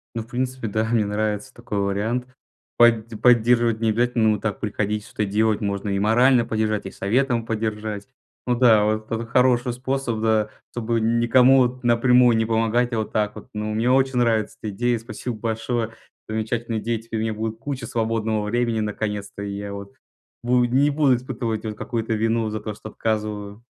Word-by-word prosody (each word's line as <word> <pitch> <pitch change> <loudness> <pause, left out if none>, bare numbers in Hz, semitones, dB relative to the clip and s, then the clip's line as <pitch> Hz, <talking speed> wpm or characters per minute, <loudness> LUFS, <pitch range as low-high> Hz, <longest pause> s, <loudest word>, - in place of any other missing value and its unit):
Ну, 115 - -2
в - - -19
принципе, 125 0 -3
да, 110 +1 0
мне 110 -1 +1
нравится 105 0 -2
такой 120 -4 -4
вариант. 105 +5 -1 0.5
Под 115 -1 +4
поддерживать 120 -1 +4
не 115 -1 +1
обязательно, 115 0 +2
но 105 - 0
так 105 -1 -3
приходить, 105 0 -2
что-то 105 - -3
делать. 105 +1 +1
Можно 100 0 -2
и 100 0 0
морально 120 +4 +4
поддержать, 110 -2 -1
и 95 - -6
советом 120 +3 0
поддержать. 110 -1 -3 0.4
Ну 125 - +1
да, 115 -4 +5
вот 110 +1 -2
это 115 +1 -2
хороший 125 +1 +2
способ, 130 -2 -2
да, 110 -1 +2 0.2
чтобы 115 -1 -1
н 115 +1 +1
никому 125 +3 +5
вот 125 0 +1
напрямую 120 0 +4
не 110 - +1
помогать. 115 +2 +1
А 115 - 0
вот 110 - -4
так 105 -1 -1
вот. - - -10
Ну, 105 0 -3
мне 115 +3 +1
очень 130 -1 +2
нравится 115 -3 +1
эта 110 - -4
идея, 120 +3 0
спасибо 115 +1 -6
большое. 115 +1 -2 0.4
Замечательные 110 +1 -2
идеи. 115 +1 -1
Теперь 115 0 -5
у - - -1
меня 110 -1 -1
будет 110 +1 -4
куча 135 0 -5
свободного 110 -1 -1
времени 115 +1 0
наконец-то. 105 -1 -4
И 100 -1 -4
я 100 0 -5
вот 100 0 -8 0.5
буд 120 0 +2
не 135 +4 +3
буду 140 -3 +3
испытывать 120 -3 -4
вот 110 -1 -4
какую-то 115 0 -2
вину 115 +1 0
за 110 0 -4
то, 105 0 -5
что 110 - -10
отказываю. 105 -1 -3
115 Hz, 185 wpm, -23 LUFS, 110-120 Hz, 0.5 s, да